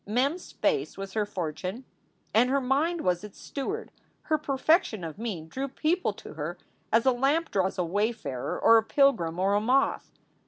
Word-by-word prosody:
Mem 250 +7 +2
s 355 - -10
face 435 -4 0
was 195 0 -6
her 215 -2 0
fortune 185 - -4 0.5
and 240 +3 +4
her 275 +1 +3
mind 295 +6 +1
was 180 +1 0
its 210 -2 -10
steward. 400 - -4 0.3
Her 310 - +1
perfection 275 - +1
of 165 +3 -6
mien 195 -9 -4
drew 265 +10 -3
people 325 +7 0
to - - -11
her - - -5 0.3
as 225 +2 +4
a 260 - +6
lamp 275 +7 +1
draws 190 0 0
a 180 - +1
wayfarer 185 - -2
or 230 - +7
a 225 - +3
pilgrim 225 - +2
or 195 +2 +2
a 205 - +3
moth. 255 +5 +1
230 Hz, 185 wpm, -28 LUFS, 195-275 Hz, 0.5 s, or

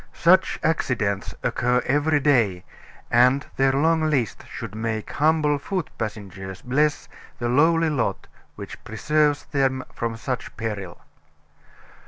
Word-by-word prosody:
Such 185 +2 +3
accidents 110 -11 -1
occur 125 +1 +1
every 145 +2 +2
day; 115 -11 +2 0.5
and 125 +3 +4
their 135 0 +4
long 155 +3 +2
list 130 -7 -1
should 115 -4 -7
make 110 0 -3
humble 150 -1 +2
foot 180 +3 -3
passengers 95 -3 -6
bless 145 +4 +1 0.3
the 120 - -2
lowly 160 +5 +3
lot 115 -9 -1 0.3
which - - -9
preserves 150 +5 +1
them 135 -2 0
from 115 -1 -3
such 125 +2 -5
peril. 100 -6 -5
130 Hz, 120 wpm, -24 LUFS, 110-150 Hz, 0.5 s, and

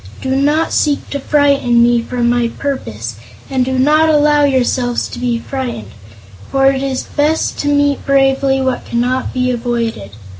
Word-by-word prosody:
"Do 265 0 -2
not 295 +4 +1
seek 290 -2 0
to 280 - -2
frighten 275 -5 +2
me 240 0 +3
from 240 0 -2
my 240 0 +1
purpose, 115 - -4 0.3
and 260 -1 +1
do 260 +1 -2
not 305 +4 +3
allow 295 -1 +3
yourselves 250 -2 0
to - - -8
be 245 -1 -1
frightened, 240 - -5 0.6
for 270 0 +1
it 270 -1 -3
is 270 -1 -2
best 305 +2 -1
to 290 - -2
meet 285 -1 +1
bravely 270 0 +2
what 260 -1 -1
cannot 250 +2 -1
be 255 0 0
avoided. 235 - -3
265 Hz, 160 wpm, -15 LUFS, 240-285 Hz, 0.6 s, me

